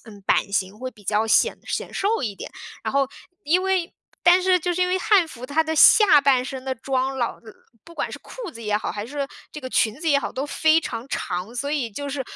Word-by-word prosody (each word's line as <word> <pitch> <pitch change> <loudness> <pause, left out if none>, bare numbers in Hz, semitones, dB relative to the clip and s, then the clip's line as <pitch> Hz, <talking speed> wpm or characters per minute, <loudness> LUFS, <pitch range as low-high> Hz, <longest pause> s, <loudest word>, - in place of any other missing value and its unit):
嗯， 205 -3 -13
版 200 +1 +1
型 195 +2 -1
会 255 - -4
比 210 -2 -19
较 210 +3 +1
显 220 - +3
显 - - -4
瘦 415 0 0
一 220 -5 -2
点。 - - -7 0.4
然 - - -2
后 275 -1 +2 0.3
因 350 +6 +2
为 375 -3 0 0.3
但 355 +1 +6
是 365 -1 +3
就 355 +2 -1
是 365 - -3
因 360 - +3
为 365 - +1
汉 375 -2 +3
服 255 -6 -10
它 300 +5 +1
的 320 0 -2
下 370 -2 +7
半 270 -3 +3
身 265 0 -7
的 265 - -2
装 265 +1 -2
老 240 - -2 0.4
不 335 - -14
管 - - -3
是 - - -5
裤 - - -9
子 230 - -10
也 210 -1 0
好， 210 - -3
还 205 0 -5
是 280 +3 -4 0.2
这 300 - -8
个 260 - -6
裙 220 -3 +1
子 325 - -1
也 285 - +5
好， 280 - -2
都 275 +3 -4
非 315 +2 +3
常 235 -1 -6
长， 185 +1 -4
所 275 +4 -3
以 260 -7 -1
就 285 +7 -6
是 275 -1 -3
275 Hz, 260 characters per minute, -23 LUFS, 230-330 Hz, 0.4 s, 下